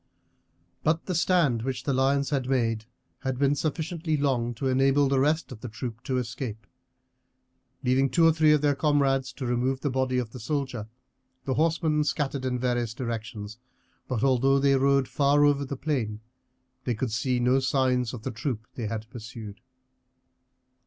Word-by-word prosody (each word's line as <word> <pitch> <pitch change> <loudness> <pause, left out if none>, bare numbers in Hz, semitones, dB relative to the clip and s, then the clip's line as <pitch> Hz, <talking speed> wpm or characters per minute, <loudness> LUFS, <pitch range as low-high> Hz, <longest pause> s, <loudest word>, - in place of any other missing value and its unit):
But 160 +2 +1
the 185 - -2
stand 165 -8 +2
which 130 +2 -3
the 140 - 0
lion 135 +2 +2
had 135 -3 -1
made 115 -4 0 0.3
had 130 -2 -3
been 140 +1 +3
sufficiently 160 +1 -2
long 125 -4 0
to 125 - -4
enable 135 +2 +3
the 135 0 +2
rest 150 +3 +1
of 115 -4 -9
the 125 - -6
troop 115 +1 -6
to 130 - 0
escape. 115 -3 -4 1.2
Leaving 130 +2 +3
two 165 +6 +4
or 165 - +6
three 155 -1 +4
of 150 -1 +4
their 145 -1 +3
comrades 135 -2 +1
to 130 - -5
remove 125 +2 0
the 145 - -1
body 130 0 0
of 120 -3 -2
the 125 - -8
soldier, 130 -3 -3 0.6
the 130 - 0
horsemen 160 0 +2
scattered 140 -3 -1
in 125 -1 0
various 120 -2 -1
directions; 115 -3 -5 0.5
but 125 -3 -2
although 135 +1 +4
they 140 0 +3
rode 135 0 +3
far 145 +1 +3
over 145 -1 +3
the 140 0 -5
plain, 120 -8 -2 0.6
they 120 - -1
could 120 +2 -2
see 125 +3 0
no 125 +2 +3
signs 130 -2 +1
of 120 -4 -8
the 130 - -3
troop 115 -2 -4
they 115 -4 -4
had 110 0 -4
pursued. 115 -3 -9
130 Hz, 175 wpm, -27 LUFS, 120-140 Hz, 1.2 s, or